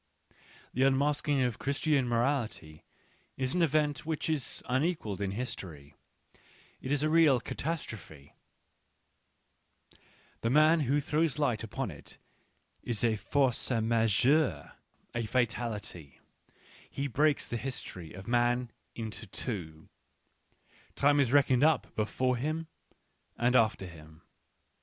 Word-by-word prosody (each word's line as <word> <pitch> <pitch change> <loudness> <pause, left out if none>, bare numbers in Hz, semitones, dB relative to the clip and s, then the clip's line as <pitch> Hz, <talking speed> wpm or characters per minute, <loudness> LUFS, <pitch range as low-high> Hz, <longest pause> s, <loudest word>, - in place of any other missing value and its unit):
The 130 - -1
unmasking 140 +1 +2
of 125 -2 -1
Christian 140 -1 +1
morality 115 - -1 0.5
is 130 -1 -1
an^event 150 -4 +2
wEich 155 -3 -2
iTlinequalled 130 - -1
in 100 - 0
history, 95 - -6 0.9
it 130 - -5
tea 145 - -1
real 155 -4 +5
catas 160 +6 -3
trophe^l 75 -9 -11 2.1
TEe" 115 - 0
man 155 +5 +5
who 145 0 +2
throws 150 0 0
light 125 -7 0
upon 115 0 -4
it 75 - -13 0.6
is 120 -2 -3
a 115 -2 +3
force 130 +3 0
majeure^ 115 +5 +2 0.4
a 120 -2 -2
fatality; 110 - -2 0.7
he 140 - -3
breaks 145 +3 +1
the 120 - -3
history 105 -8 -7
of 95 +3 -10
man 120 0 +1 0.2
into 110 -1 -6
j 100 -2 -3
woT" 80 0 -17 1.1
Time^is 140 -3 +3
reckoned 135 -2 +4
up 160 0 +2
before 125 +4 0
him 155 +6 -2 0.7
and 120 +1 +2
after 110 -5 +3
him. 80 -2 -13
125 Hz, 110 wpm, -30 LUFS, 110-145 Hz, 2.1 s, real